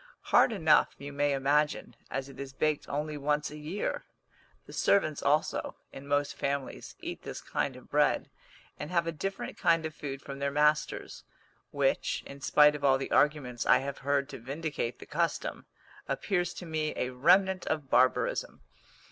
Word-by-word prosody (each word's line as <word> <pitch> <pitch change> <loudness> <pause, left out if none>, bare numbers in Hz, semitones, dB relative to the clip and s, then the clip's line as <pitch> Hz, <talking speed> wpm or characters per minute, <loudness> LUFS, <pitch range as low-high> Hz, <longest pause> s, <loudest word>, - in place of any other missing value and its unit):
Hard - - +6
enough, 160 -8 +3
you 140 0 -8
may 145 0 +1
imagine, 145 +2 +1
as 135 0 -3
it 135 -1 -13
is 135 -1 -6
baked 155 +1 -1
only 150 +1 -2
once 150 +1 0
a 150 - -8
year. 160 +7 -3 0.6
The - - -12
servants 155 -7 +2
also, 150 +2 0 0.2
in 135 +1 -10
most 145 0 +1
families, 140 -1 -3
eat - - -6
this - - -6
kind - - -2
of - - -15
bread, - - +2 0.5
and 150 - -5
have 170 -2 +1
a 165 - -1
different 195 +5 -5
kind 165 -1 +3
of 155 - -4
food 135 -3 -6
from 140 0 -8
their 140 0 0
masters, 150 +1 0 0.5
which, - - 0
in 140 0 -10
spite 150 +2 +5
of 150 -1 -7
all 135 -1 +5
the 135 - -5
arguments 135 -5 +1
I - - +7
have 140 0 -5
heard 140 0 0
to - - -8
vindicate 140 0 -4
the - - -11
custom, - - -2 0.4
appears 180 -3 -1
to 180 - -7
me 155 -2 -2
a 125 - -2
remnant 185 +8 +3
of 150 -4 -2
barbarism. 130 0 +2
150 Hz, 175 wpm, -30 LUFS, 140-155 Hz, 0.6 s, I